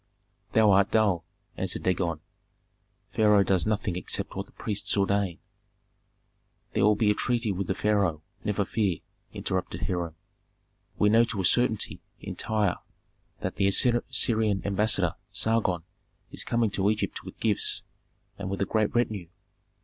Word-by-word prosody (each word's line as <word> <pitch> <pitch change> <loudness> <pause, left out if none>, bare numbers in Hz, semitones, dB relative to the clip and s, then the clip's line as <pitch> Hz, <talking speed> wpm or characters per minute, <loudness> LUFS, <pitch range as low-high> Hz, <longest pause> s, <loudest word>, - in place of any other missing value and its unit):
"Thou 110 -2 +5
art 100 +1 +4
dull!" 100 -6 +2 0.3
answered - - -1
Dagon. 85 -4 0 0.9
"Pharaoh 105 -2 +4
does 95 0 +1
nothing 105 -4 0
except 90 - -2
what - - -4
the - - -21
priests 105 -1 -2
ordain." 100 -3 +1 1.4
"There - - +2
will 105 +1 +5
be 105 0 +3
a - - +3
treaty 115 0 0
with 95 -1 -3
the 95 - 0
pharaoh, 100 -8 +1 0.2
never 105 -1 0
fear!" 100 -5 -1 0.3
interrupted 95 -1 -3
Hiram. 85 -3 -2 0.8
"We 105 - +4
know 115 +2 +6
to 105 -4 -3
a - - 0
certainty 115 +1 +2 0.2
in - - -7
Tyre 105 -4 0 0.6
that - - -3
the 100 - +3
Assyrian 110 -2 +1
ambassador 100 -3 +2 0.2
Sargon 105 -7 0 0.5
is - - -2
coming 115 -3 +1
to 100 +1 +1
Egypt 110 0 -2
with - - -11
gifts 105 -3 +2 0.6
and 100 -1 -4
with 100 - -3
a 100 - +1
great 110 +2 0
retinue. 110 -7 0
100 Hz, 145 wpm, -27 LUFS, 95-110 Hz, 1.4 s, know